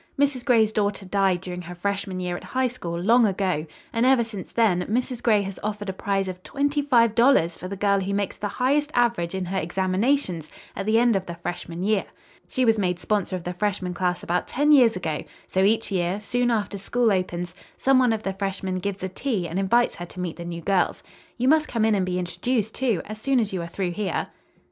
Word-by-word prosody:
"Mrs. 280 -3 +1
Gray's 225 -5 +4
daughter 205 -2 -1
died 190 -2 +1
during 180 -1 -6
her 175 0 -8
freshman 195 0 -2
year 180 -1 -2
at - - -7
High 260 0 0
School, 170 -9 -5
long 230 +5 +5
ago, 185 -5 -1 0.3
and 230 - +1
ever 260 -2 +5
since 215 -5 -7
then, 210 -6 +2
Mrs. 245 +2 -1
Gray 215 -4 +3
has 195 -1 -6
offered 210 -1 -3
a - - -2
prize 195 0 -1
of 185 -1 -6
twenty 285 +6 0
five 235 -6 +4
dollars 230 -9 +4
for 185 - -7
the 200 - -5
girl 200 0 +2
who 195 +1 -2
makes 200 -1 -1
the 205 - -3
highest 280 +7 +1
average 235 -8 +1
in 190 -1 -2
her 190 +2 -1
examinations 185 - 0 0.3
at 195 - -4
the 220 +1 +4
end 235 -1 +4
of 190 -1 -1
the 170 - -5
freshman 170 0 -5
year. 210 0 +1 0.4
She 255 - +1
was 225 -2 +3
made 180 -3 0
sponsor 200 -1 -1
of 180 - -5
the 180 - -4
freshman 185 -1 -1
class 180 0 -1
about 175 +1 -1
ten 295 +3 +2
years 245 -7 +6
ago, 160 -4 -3 0.2
so 190 - 0
each 220 +3 +2
year, 180 +1 0
soon 245 +4 0
after 205 -3 -1
school 230 +3 +1
opens, 180 -2 -2 0.2
some 270 -1 +4
one 250 -2 +4
of 220 -1 -2
the 195 - -2
freshmen 190 -1 -3
gives 200 0 -4
a - - 0
tea 195 -3 -2
and 170 +4 -2
invites 235 +5 +2
her 175 - -6
to 180 - -11
meet 180 -2 -3
the 170 - -7
new 170 -1 -5
girls. 190 -1 +1 0.3
You 250 +1 0
must 305 +2 +4
come 225 -2 0
in 220 - +3
and 190 -3 +1
be 180 0 -1
introduced, 220 +5 -1
too, 235 -10 0
as 215 +1 -8
soon 270 +1 +2
as 215 -4 -1
you 185 - -2
are 170 - -5
through 180 +1 -2
here." 190 -2 -2
200 Hz, 230 wpm, -24 LUFS, 180-235 Hz, 0.4 s, years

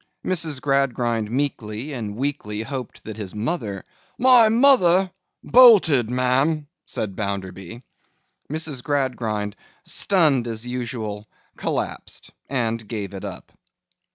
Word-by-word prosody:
Mrs. 160 -6 -1
Gradgrind 125 -5 0
meekly 125 0 -3
and 110 -5 -4
weakly 110 -5 -3
hoped 125 0 -6
that 110 -1 -7
his 105 -3 -6
mother— 105 - -3 0.3
'My 245 -3 +6
mother? 195 -7 +5 0.3
Bolted, 195 - +6
ma'am!' 130 +5 +1 0.2
said 100 -3 -3
Bounderby. 100 +2 -5 0.7
Mrs. 155 -5 -3
Gradgrind, 120 -8 -1 0.3
stunned 155 -11 +2
as 115 0 -5
usual, 115 -4 -4 0.3
collapsed - - -4 0.2
and 115 -4 -1
gave 105 -3 -5
it 95 - -7
up. - - -8
125 Hz, 105 wpm, -23 LUFS, 110-150 Hz, 0.7 s, My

